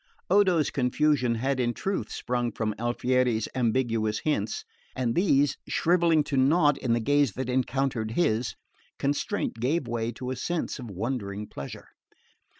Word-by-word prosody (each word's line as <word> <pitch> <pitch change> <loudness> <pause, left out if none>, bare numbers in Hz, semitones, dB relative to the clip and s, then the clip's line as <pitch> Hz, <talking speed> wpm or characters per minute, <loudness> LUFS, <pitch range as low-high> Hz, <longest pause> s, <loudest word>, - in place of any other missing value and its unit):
Odo's 185 -6 +4
confusion 130 -1 +2
had 130 +3 -1
in 120 -1 0
truth 195 0 -2
sprung 120 -1 -2
from 110 -1 -2
Alfieri's 120 -1 +1
ambiguous 115 -3 +1
hints; 295 - -1 0.3
and 120 -3 0
these 145 -5 +3
shrivelling 170 -2 +3
to 145 - -3
nought 145 +2 +4
in 120 -3 0
the 120 - +2
gaze 145 -1 +2
that 130 +2 -4
encountered 125 -3 0
his, 110 - +1 0.4
constraint 145 - -1
gave 135 +4 0
way 115 0 -2
to 125 +1 -5
a - - -2
sense 170 +3 -3
of 120 -3 -7
wondering 105 0 -3
pleasure. 70 -8 -9
130 Hz, 145 wpm, -27 LUFS, 115-145 Hz, 0.4 s, Odo's